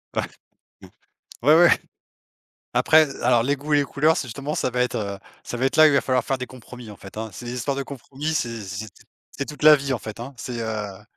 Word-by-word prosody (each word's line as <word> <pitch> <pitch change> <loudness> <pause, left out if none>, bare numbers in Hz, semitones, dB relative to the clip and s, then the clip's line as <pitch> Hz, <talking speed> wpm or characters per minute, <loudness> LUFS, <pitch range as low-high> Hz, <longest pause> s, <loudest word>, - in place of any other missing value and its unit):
Ouais. - - +2 1.2
Ouais, 150 +5 +6
ouais. 175 +1 +7 1.0
Après 155 0 +5 0.2
alors 120 -1 +4
les 140 +4 +1
goûts 145 +2 -3
et - - +6
les - - +2
couleurs 155 +3 +2
c'est 130 - -3
justement 140 +5 -5
ça - - 0
va 125 +1 0
être, 125 - 0
heu, 100 -2 -4 0.2
ça 120 - -5
va 130 - 0
être 135 - 0
là 155 - +9
où - - +9
il 150 - +3
va 140 - +4
falloir 130 -1 +1
faire 135 - -1
des 125 - -4
compromis 125 -2 -11
en 100 - -12
fait, 100 +1 -12
hein. 110 0 -4
C'est 120 - -9
des 120 - -4
histoires 130 +3 -2
de 140 - -2
compromis, 140 +3 -5
c'est 115 -7 -2
c'est 100 +3 -6 0.4
c'est 140 - -4
toute 150 +1 -9
la 155 0 +10
vie 140 -1 -2
en 120 - -2
fait, 110 0 -8
hein, 125 +4 -7
c'est, 120 +2 -5
heu 105 -3 -5
125 Hz, 245 wpm, -23 LUFS, 115-140 Hz, 1.2 s, la